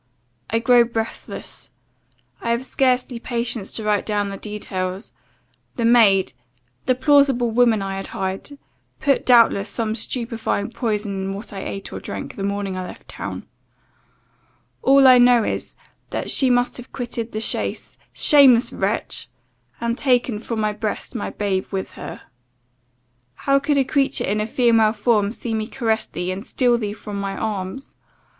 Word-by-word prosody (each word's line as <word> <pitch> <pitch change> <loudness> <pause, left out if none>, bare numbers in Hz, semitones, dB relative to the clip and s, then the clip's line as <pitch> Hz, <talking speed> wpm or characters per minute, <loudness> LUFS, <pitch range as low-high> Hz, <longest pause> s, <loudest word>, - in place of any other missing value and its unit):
I 225 - +1
grow 240 +1 +5
breathless. 230 -1 -6 0.7
I 235 - -3
have 235 +2 0
scarcely 255 -2 +1
patience 235 -3 -3
to 220 - -3
write 210 -1 +1
down 205 -1 -1
the 195 - -6
details. 190 -2 -5 0.6
The 235 - -1
maid 220 -5 +5 0.5
the 255 - +3
plausible 265 -3 +3
woman 225 -3 +3
I 195 0 -4
had 195 - -4
hired 190 +9 -5 0.4
put, 280 -2 +1
doubtless, 230 -5 +5
some 220 +1 -2
stupefying 230 -2 -3
potion 210 -5 -2
in 190 0 -3
what 205 +2 -7
I 195 - -5
ate 195 - -6
or - - -5
drank, - - -7
the - - -7
morning 200 -1 -2
I 185 0 -4
left - - -12
town. - - -6 1.4
All 270 0 +6
I 255 -1 +8
know 245 -1 +6
is, - - -4 0.3
that - - -3
she 265 - +3
must 245 0 +2
have 245 0 -10
quitted 235 -2 -4
the 215 - -3
chaise, 225 - -2
shameless 270 -5 +5
wretch! - - -2 0.5
and 235 0 -1
taken 245 -4 +1
(from 225 0 -4
my 215 -1 0
breast) 215 0 -4
my - - -3
babe 195 -2 -2
with 190 -1 -4
her. - - -9 1.1
How 275 - +2
could 280 +1 0
a 275 - +4
creature 275 +1 0
in 210 +2 0
a 215 - -2
female 225 -2 +3
form 210 -2 +1
see 235 -1 -5
me 215 -1 -2
caress 225 -3 -1
thee, 180 +3 -4
and 190 +2 -5
steal 245 -1 +1
thee 205 -2 -3
from 210 -1 -7
my 195 0 -3
arms! 210 +4 -4
225 Hz, 160 wpm, -21 LUFS, 205-245 Hz, 1.4 s, I